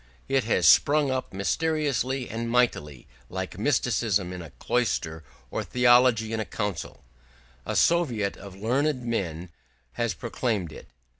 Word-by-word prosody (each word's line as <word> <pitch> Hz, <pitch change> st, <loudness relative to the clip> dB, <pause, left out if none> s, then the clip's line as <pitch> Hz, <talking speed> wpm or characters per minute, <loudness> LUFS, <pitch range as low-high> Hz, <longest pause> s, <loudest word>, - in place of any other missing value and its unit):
It 135 Hz, -3 st, +1 dB
has 90 Hz, -7 st, +2 dB
sprung 145 Hz, -, +5 dB
up 130 Hz, 0 st, -3 dB
mysteriously 135 Hz, +3 st, -1 dB
and 115 Hz, +1 st, -4 dB
mightily, 75 Hz, -, 0 dB, 0.2 s
like -, -, -5 dB
mysticism 100 Hz, -5 st, +1 dB
in 90 Hz, -, -6 dB
a 85 Hz, -, -9 dB
cloister 85 Hz, -8 st, -2 dB, 0.3 s
or -, -, -2 dB
theology 120 Hz, -3 st, +4 dB
in 110 Hz, -, -1 dB
a -, -, 0 dB
council: 105 Hz, -5 st, -5 dB, 0.6 s
a -, -, -2 dB
Soviet 125 Hz, -13 st, +2 dB
of 95 Hz, -1 st, -11 dB
learned 125 Hz, +5 st, 0 dB
men 90 Hz, -7 st, -3 dB, 0.4 s
has 115 Hz, -5 st, -1 dB
proclaimed 110 Hz, -7 st, -2 dB
it. -, -, -11 dB
115 Hz, 135 wpm, -26 LUFS, 95-130 Hz, 0.6 s, sprung